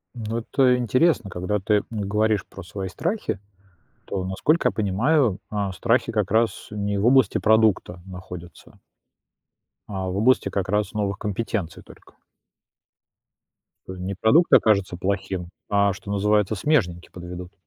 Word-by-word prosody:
Ну, 115 -1 -4
это 125 +2 +2
интересно, 125 - +2
когда 95 +4 -2
ты 105 +1 +2
говоришь 105 -1 0
про - - -11
свои 95 +2 -6
страхи, 170 - -3 0.7
то, 95 -1 -3
насколько 145 - +1
я - - -3
понимаю, 110 +3 +1
а, 100 -2 -2
страхи 115 +3 +1
как 105 -4 0
раз 110 -2 +1
не 100 -1 -2
в 100 - -1
области 130 -1 +4
продукта 110 -5 +2
находятся. 90 -2 -11 1.1
А 95 -2 -4
в 90 - -4
области 120 +6 +3
как 95 -2 -2
раз 105 +3 0
новых 100 -2 -1
компетенций 105 -4 -3
только. - - -18 1.7
Т 95 - -6
э, 95 - -10
не 95 +2 -4
продукт 145 - +3
окажется 100 -5 +4
плохим, 95 -2 -3 0.2
а, 100 -1 +3
что 100 +1 -8
называется, 105 +1 +2
смежники 95 - 0
подведут. 90 +1 -9
105 Hz, 140 wpm, -23 LUFS, 95-115 Hz, 1.7 s, области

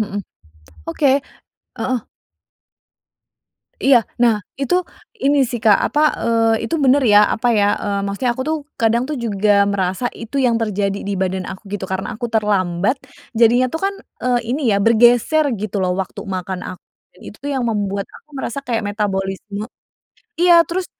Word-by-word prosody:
mhm. 205 -1 -3 0.7
Oke 275 -2 +2 0.6
heeh. 255 -1 -1 1.8
Iya, 270 -1 +4 0.3
nah 230 -2 +5 0.3
itu 275 +5 0 0.5
ini 285 +1 +3
sih 240 -3 -4
Kak 210 -3 +7
apa, 295 - 0 0.2
eee, 225 -1 +2
itu 330 - -3
bener 275 +2 +4
ya 205 - +8 0.2
apa 245 +2 -1
ya, 205 -2 +3 0.2
eee, 200 -1 -1
maksudnya 200 +6 -1
aku 260 - -4
tuh 315 - +1 0.2
kadang 230 +1 +3
tuh 305 - -3
juga 210 -1 0 0.2
merasa 190 +3 -1
itu 230 +5 -7
yang 245 -3 +3
terjadi 205 -3 -1
di 200 - -3
badan 190 0 -1
aku 190 +2 -9
gitu 195 -2 -3
karena 190 0 -3
aku 240 - -6
terlambat, 205 0 +1 0.4
jadinya 240 +2 +5
itu 290 - -4
kan, 395 - 0 0.3
eee, 250 -1 +2
ini 270 +5 -1
ya - - +3
bergeser 240 +7 +4 0.2
gitu 215 -1 -4
loh 180 -1 +1
waktu 190 - -6
makan 185 -1 -4
aku 180 - -14 0.4
itu 210 - -10
tuh 285 - -4
yang 260 -2 -1
membuat 200 -2 -1
aku 305 - -20
merasa 265 0 -4
kayak 235 -3 -1
metabolisme, 200 0 -3 0.8
iya 350 +1 +5
terus 360 +1 -3
225 Hz, 160 wpm, -19 LUFS, 200-250 Hz, 1.8 s, ya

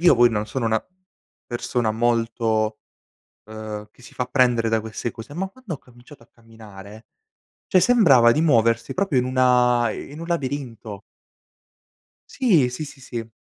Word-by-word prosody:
io 175 -4 +6
poi 120 -1 +5
non 105 -1 -2
sono 125 +3 -3
una 110 -1 +1 0.6
persona 120 -1 -2
molto, 115 -1 0 0.7
ehm, 110 -1 -7
che 115 - -23
si 125 - -14
fa 125 - -2
prendere 125 -3 +2
da 110 -1 +1
queste 110 +2 -5
cose, 115 +6 -11
ma 190 +4 -3
quando 215 -3 -9
ho - - -13
cominciato 125 +1 -18
a - - -24
camminare, 110 -2 -14 0.6
cioè 185 - +3
sembrava 145 - +5
di 135 - +2
muoversi 115 -7 +2
proprio, 185 -8 +1
in 125 - +1
una 125 -2 +3
in 145 +7 -8
un 165 - -6
labirinto. 130 - -4 1.4
Sì, 170 - +4
sì, 140 +5 -6
sì, 140 -1 -13
sì. 115 -3 -6
120 Hz, 155 wpm, -22 LUFS, 110-140 Hz, 1.4 s, io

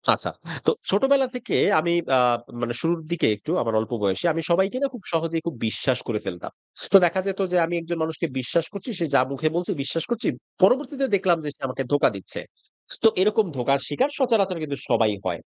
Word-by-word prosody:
আচ্ছা। - - -3 0.4
তো - - +5 0.2
ছোটবেলা 270 +6 +3
থেকে 250 0 -3 0.2
আমি 170 +2 0 0.2
আ - - +6 0.4
মানে 120 0 -1
শুরুর 165 +1 0
দিকে 170 - +1
একটু 150 +10 -6
আমার 115 -1 -1
অল্প 110 +1 -4
বয়সে, 95 - 0
আমি 165 - -2
সবাইকে 190 +7 +2
না? - - +3
খুব 235 -6 -10
সহজেই 165 0 0
খুব 165 - -3
বিশ্বাস 125 +3 0
করে 110 -4 -1
ফেলতাম। 90 -3 -6 0.4
তো 195 - +10
দেখা 180 +2 +1
যেত 195 0 -3
যে 180 - +3
আমি 175 +1 -3
একজন 165 0 -4
মানুষকে 160 +1 -2
বিশ্বাস 150 +6 0
করছি, 200 +4 -7
সে 170 - +1
যা - - +6
মুখে 145 +3 -1
বলছে 175 0 -1
বিশ্বাস 160 +4 -2
করছি। 235 -1 -1 0.4
পরবর্তীতে 270 +6 +3
দেখলাম 185 -3 +2
যে 150 - -3
সে - - -36
আমাকে 130 +1 -3
ধোঁকা 145 - +4
দিচ্ছে। 95 - -4 0.6
তো - - +8
এরকম 210 +2 +3
ধোকার 135 +3 +2
শিকার 150 - +1
সচারাচর 210 -8 +2
কিন্তু 145 -2 -4
সবাই 110 -2 +3
হয়। 85 -2 -2
165 Hz, 200 wpm, -24 LUFS, 135-195 Hz, 0.6 s, তো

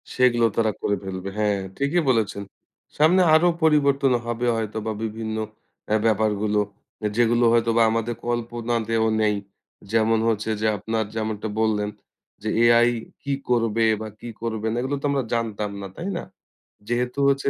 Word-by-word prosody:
সেগুলো 120 -2 +4
তারা 110 -2 +3
করে 100 - +1
ফেলবে। 95 0 -5
হ্যাঁ, 105 -2 +1 0.2
ঠিকই 145 +5 +1
বলেছেন। 105 -4 +1 0.5
সামনে 170 +5 +5
আরো 165 +3 +6 0.2
পরিবর্তন 140 -4 +3
হবে 120 +1 -2
হয়তোবা 110 0 -3
বিভিন্ন 110 0 -4 0.5
এ্যাঁ 110 0 +1
ব্যাপারগুলো, 105 -1 +1 0.5
আ - - +3
যেগুলো 120 0 +3
হয়তোবা 115 0 +3
আমাদের 115 +1 -1
কল্পনাতেও 115 -1 -1 0.2
নেই। 105 -1 +2 0.6
যেমন 115 0 +3
হচ্ছে 110 -1 0
যে, - - 0
আপনার 110 +2 -1
যেমনটা 110 -1 -2
বললেন 105 -2 +1 0.5
যে, 110 - -1
এআই 120 0 +6 0.3
কি 140 0 -1 0.2
করবে 115 -2 +2 0.2
বা 110 - -4
কি 120 - -8
করবে 110 -1 -2
না, - - -2
এগুলো 135 +2 -1
তো - - -4
আমরা 135 -2 0
জানতাম 105 -3 -2
না, 100 - -5
তাই 185 +4 -4
না? - - -5 0.6
যেহেতু 125 +2 -1
হচ্ছে 140 0 +1
115 Hz, 150 wpm, -23 LUFS, 110-120 Hz, 0.6 s, আরো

